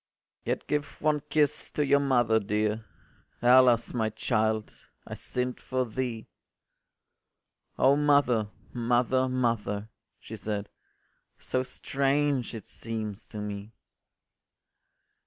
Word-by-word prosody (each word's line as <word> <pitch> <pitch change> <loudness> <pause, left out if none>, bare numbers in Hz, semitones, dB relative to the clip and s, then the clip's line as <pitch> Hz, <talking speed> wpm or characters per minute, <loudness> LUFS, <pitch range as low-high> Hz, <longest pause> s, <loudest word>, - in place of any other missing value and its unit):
” - - -58
“Yet - - -1
give 150 0 -2
one 150 -1 +2
kiss 150 -2 +1
to 150 - 0
your 140 +1 +4
mother 120 -5 +3
dear! 105 +1 -1 0.5
Alas, 125 -1 +5
my 110 -3 +1
child, 110 -1 0 0.3
I - - -7
sinn’d 125 0 -3
for 130 -1 -1
thee.” 115 -1 -3 1.5
“O 135 +2 +5
mother, 140 -7 +3 0.3
mother, 125 +2 +2
mother,” 115 -4 -1 0.3
she - - -9
said, 105 -1 -4 0.7
“So 130 - -1
strange 140 -1 0
it 110 - -8
seems 110 -2 -5
to - - -9
me. 105 +1 -5
120 Hz, 110 wpm, -28 LUFS, 110-130 Hz, 1.5 s, Alas